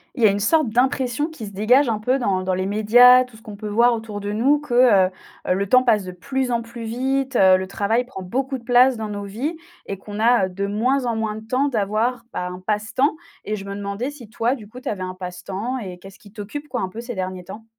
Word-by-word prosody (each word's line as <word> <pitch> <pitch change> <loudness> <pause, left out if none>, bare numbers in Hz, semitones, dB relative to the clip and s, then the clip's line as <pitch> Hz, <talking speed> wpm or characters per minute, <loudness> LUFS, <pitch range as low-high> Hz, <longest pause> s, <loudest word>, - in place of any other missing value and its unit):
Il 245 - -5
y - - +9
a - - +5
une 200 +1 0
sorte 295 +6 +2
d'impression 255 +3 +1
qui 285 -10 -8
se 200 - -10
dégage 245 +7 +3
un 220 - 0
peu 250 +5 0
dans 190 -6 0
dans 185 0 -1
les 185 +1 -1
médias, 245 +5 +6
tout 250 -3 -15
ce 220 - -16
qu'on 215 -2 -9
peut 210 +1 -7
voir 235 +3 +3
autour 220 -2 -6
de 205 +1 -3
nous, 265 +8 +2
que, 290 -5 -4 0.3
heu, - - -6 0.4
heu, - - +3
le 200 +1 -1
temps 255 +6 +5
passe 225 -5 +2
de 185 - -7
plus 260 +8 -3
en 235 -1 +1
plus 230 0 -9
vite, 265 +3 -1
heu, 190 -3 +6
le 190 - -3
travail 210 +5 0
prend 245 -6 -9
beaucoup 260 +8 -3
de - - -19
place 250 +2 +5
dans 220 -1 -4
nos 205 -1 -5
vies 245 +12 -4 0.3
et 195 - -4
qu'on 205 +2 -8
a, 230 -2 +4
heu, - - -5
de 200 +2 -3
moins 250 +6 0
en 235 - 0
moins 220 -1 -2
de 220 0 -10
temps 260 +4 +1
d'avoir, 230 +1 -1
ben, 180 0 -4
un 180 - -8
passe-temps. 215 +9 0 0.3
Et 215 - -2
je 200 -1 -8
me 200 0 -6
demandais 200 +6 -4
si 255 -7 -13
toi, 235 +2 0
du 225 -6 -8
coup, 245 - -10
tu 260 - -10
avais 200 -3 -4
un 185 0 -5
passe-temps 190 +7 -5
et 185 -6 -7
qu'est-ce 195 +2 -14
qui 205 - -17
t'occupe, 230 +8 -7
quoi, 245 -6 -3
un 185 - -2
peu 220 +5 -7
ces 240 0 -6
derniers 185 -1 -4
temps? 220 +4 -10
220 Hz, 270 wpm, -22 LUFS, 200-250 Hz, 0.4 s, y